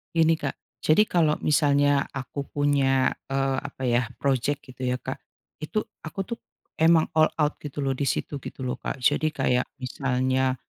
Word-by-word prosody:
Gini 165 0 +4
Kak, 140 - -3 0.2
jadi 160 +7 +5
kalau 165 -7 +2
misalnya 145 -1 +3
aku 135 +1 -5
punya, 140 -2 +2 0.2
eee, 135 -1 0
apa 140 -1 -8
ya, 120 -1 +2
projek 140 +1 0
gitu 130 -1 -6
ya 125 - +1
Kak, - - -5 0.4
itu 185 +8 -2 0.2
aku 195 +5 -3
tuh 235 +3 -6 0.4
emang 160 0 +4
all 155 - +7
out 150 -1 0
gitu 145 -1 -5
loh 135 - +1
di 135 +1 -1
situ 145 +2 -2
gitu 130 - -8
loh 125 0 -3
Kak, - - -3
jadi 145 +3 +3
kayak 130 -4 +1
misalnya, 130 0 0
140 Hz, 170 wpm, -26 LUFS, 130-150 Hz, 0.4 s, all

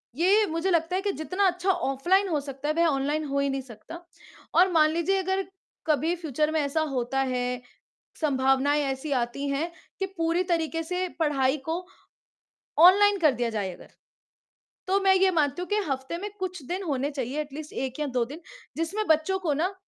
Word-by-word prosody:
ये 395 +7 +4
मुझे 330 +4 -1
लगता 335 +2 +1
है 380 - 0
कि 405 0 0
जितना 375 +4 +1
अच्छा 365 +2 +1
ऑफलाइन 360 +7 +1
हो 305 -3 +1
सकता 275 +1 -6
है, - - +2
वह 335 0 +4
ऑनलाइन 295 +2 0
हो 280 -1 -1
ही 280 0 +1
नहीं 270 0 -2
सकता। 265 +8 -11 0.5
और 365 +2 +5
मान 310 -2 +5
लीजिए 340 +4 +1
अगर 380 +1 -1 0.4
कभी 315 +3 +2
फ्यूचर 310 -2 -1
में 315 - +1
ऐसा 285 +3 0
होता 250 +2 -1
है, 250 0 -2 0.6
संभावनाएँ 275 0 +2
ऐसी 270 +2 -3
आती 275 +4 -4
हैं, 305 +5 -1 0.3
कि 385 - -1
पूरी 330 +2 +1
तरीके 330 0 0
से 360 +2 -2
पढ़ाई 275 -2 +2
को 350 +2 -2 1.0
ऑनलाइन 405 +2 +6
कर 310 -4 +5
दिया 240 -1 -1
जाए 205 -4 -2
अगर, - - -15 1.0
तो 390 +1 +3
मैं 385 -1 +5
ये 380 0 +4
मानती 310 0 +1
हूँ 360 - -6
कि 415 - +1
हफ्ते 265 +4 -3
में 410 +4 -5
कुछ 365 -5 -4
दिन 370 +2 -3
होने 285 -2 -1
चाहिए 275 +2 -3
एट 295 -2 -9
लीस्ट 305 +1 -8
1 265 +2 -4
या 300 - 0
2 240 - +2
दिन, 295 +8 -10 0.4
जिसमें 390 +7 -1
बच्चों 320 +5 +2
को 335 -6 0
ना, 350 +7 0
315 Hz, 195 wpm, -26 LUFS, 275-360 Hz, 1.0 s, ऑनलाइन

